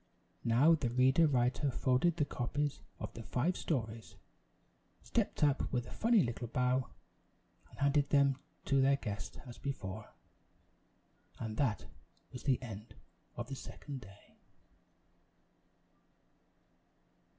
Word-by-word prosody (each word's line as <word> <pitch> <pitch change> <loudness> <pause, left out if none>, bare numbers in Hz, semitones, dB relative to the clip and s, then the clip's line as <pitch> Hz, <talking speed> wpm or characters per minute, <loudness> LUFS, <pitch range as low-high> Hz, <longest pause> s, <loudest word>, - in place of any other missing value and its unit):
Now 125 +8 +5
the 145 -7 +1
Ready 130 +6 +5
Writer 130 0 +2
folded 130 +7 +2
the 145 - +2
copies 145 +2 -2 0.2
of - - -5
the 115 - -7
five 140 +10 0
stories; 115 -7 -3 0.9
stepped - - 0
up 140 -2 +2
with 125 -2 0
a - - -11
funny 230 -3 +4
little 120 0 -3
bow 125 +2 +1 0.8
and - - -16
handed 140 0 +2
them 140 -2 +4 0.3
to 135 -1 +3
their 135 +1 +5
guest 105 -6 -5
as 120 -2 -10
before; 110 -7 -5 1.3
and 110 -1 -4
that 125 -8 +1 0.5
was 125 - -6
the 135 -3 +3
end 110 -2 -8 0.4
of 120 0 -4
the 135 - -5
Second 135 0 -8
Day. 100 -2 -16
130 Hz, 120 wpm, -34 LUFS, 120-140 Hz, 1.3 s, Now